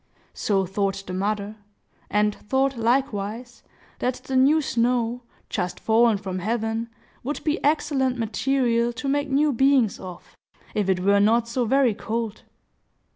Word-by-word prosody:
So 195 Hz, -2 st, 0 dB
thought 195 Hz, +1 st, -2 dB
the 180 Hz, -, -6 dB
mother; 205 Hz, +2 st, -2 dB, 0.5 s
and 210 Hz, 0 st, +2 dB
thought, 265 Hz, +6 st, 0 dB
likewise, 235 Hz, -1 st, -1 dB, 0.4 s
that 250 Hz, 0 st, 0 dB
the 265 Hz, -, -4 dB
new 275 Hz, +5 st, +5 dB
snow, 245 Hz, -3 st, 0 dB, 0.3 s
just 180 Hz, 0 st, -3 dB
fallen 225 Hz, -1 st, +3 dB
from 190 Hz, -2 st, -5 dB
heaven, 225 Hz, +3 st, -2 dB, 0.3 s
would 290 Hz, +4 st, -4 dB
be 310 Hz, +2 st, -1 dB
excellent 280 Hz, -4 st, +1 dB
material 235 Hz, +1 st, 0 dB
to 255 Hz, +4 st, -5 dB
make 285 Hz, +1 st, 0 dB
new 285 Hz, +2 st, +2 dB
beings 265 Hz, -3 st, +3 dB
of, 180 Hz, -2 st, -10 dB, 0.4 s
if 205 Hz, -2 st, 0 dB
it 185 Hz, -1 st, +1 dB
were 200 Hz, +2 st, +4 dB
not 225 Hz, +3 st, +3 dB
so 240 Hz, +1 st, -1 dB
very 260 Hz, 0 st, +3 dB
cold. 225 Hz, +1 st, -4 dB
230 Hz, 140 wpm, -24 LUFS, 205-265 Hz, 0.5 s, new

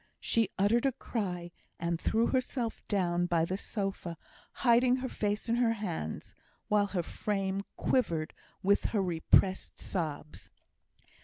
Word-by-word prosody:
She 225 Hz, -4 st, +2 dB
uttered 230 Hz, +7 st, +3 dB
a 270 Hz, -, 0 dB
cry, 180 Hz, -9 st, -3 dB, 0.3 s
and 170 Hz, 0 st, -1 dB
threw 225 Hz, +1 st, +2 dB
herself 250 Hz, -3 st, -1 dB
down 175 Hz, -3 st, +1 dB
by 165 Hz, -2 st, +2 dB
the 185 Hz, -, -2 dB
sofa, 195 Hz, -4 st, -3 dB, 0.5 s
hiding 245 Hz, +1 st, +5 dB
her 260 Hz, 0 st, -3 dB
face 210 Hz, -1 st, -1 dB
in 230 Hz, +1 st, +2 dB
her 235 Hz, -2 st, +3 dB
hands, 175 Hz, -, -4 dB, 0.4 s
while 210 Hz, -1 st, +3 dB
her 185 Hz, -3 st, -1 dB
frame 195 Hz, +1 st, -2 dB
quivered 170 Hz, -12 st, 0 dB, 0.3 s
with 200 Hz, +1 st, +3 dB
her 210 Hz, -, +1 dB
repressed 185 Hz, +2 st, +2 dB
sobs. 155 Hz, -4 st, -4 dB
200 Hz, 135 wpm, -31 LUFS, 175-230 Hz, 0.5 s, hiding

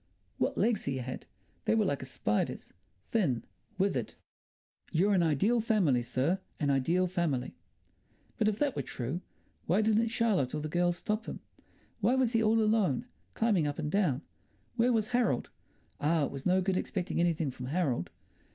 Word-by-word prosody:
What -, -, 0 dB
legs 230 Hz, -3 st, +1 dB
he 135 Hz, -1 st, -1 dB
had! 130 Hz, 0 st, -6 dB, 0.4 s
They -, -, +3 dB
were 220 Hz, -2 st, +3 dB
like 140 Hz, -7 st, -1 dB
a -, -, -5 dB
spider's—thin, 120 Hz, -, -2 dB, 0.3 s
withered. 195 Hz, +1 st, 0 dB, 0.8 s
"You're 190 Hz, +5 st, +3 dB
an 185 Hz, -, +4 dB
ideal 195 Hz, -, +2 dB
family, 195 Hz, -, +2 dB
sir, 135 Hz, +10 st, 0 dB, 0.2 s
an 145 Hz, -2 st, +2 dB
ideal 165 Hz, +7 st, +2 dB
family." 170 Hz, -8 st, -1 dB, 0.9 s
But 215 Hz, -, +3 dB
if 210 Hz, -1 st, +1 dB
that 290 Hz, 0 st, 0 dB
were -, -, -1 dB
true, 135 Hz, +8 st, -4 dB, 0.5 s
why 190 Hz, +6 st, +3 dB
didn't 220 Hz, +1 st, +3 dB
Charlotte 220 Hz, -, +1 dB
or -, -, -1 dB
the 155 Hz, -, -4 dB
girls 175 Hz, +1 st, +1 dB
stop 215 Hz, +4 st, -2 dB
him? -, -, -5 dB, 0.6 s
Why 230 Hz, +4 st, +3 dB
was 260 Hz, -3 st, +2 dB
he 225 Hz, -, +3 dB
all 220 Hz, 0 st, +3 dB
alone, 215 Hz, -, +2 dB, 0.3 s
climbing 205 Hz, -9 st, +2 dB
up 145 Hz, -, -3 dB
and 150 Hz, -2 st, -3 dB
down? 160 Hz, -8 st, +1 dB, 0.5 s
Where 240 Hz, +1 st, +3 dB
was 220 Hz, -2 st, +1 dB
Harold? 240 Hz, -, +1 dB, 0.5 s
Ah, 155 Hz, 0 st, +2 dB
it -, -, -5 dB
was 135 Hz, +3 st, -4 dB
no 185 Hz, +1 st, +4 dB
good 185 Hz, 0 st, 0 dB
expecting 185 Hz, -2 st, -2 dB
anything 165 Hz, -4 st, +1 dB
from 125 Hz, 0 st, -7 dB
Harold. 135 Hz, -, 0 dB
180 Hz, 170 wpm, -31 LUFS, 140-215 Hz, 0.9 s, an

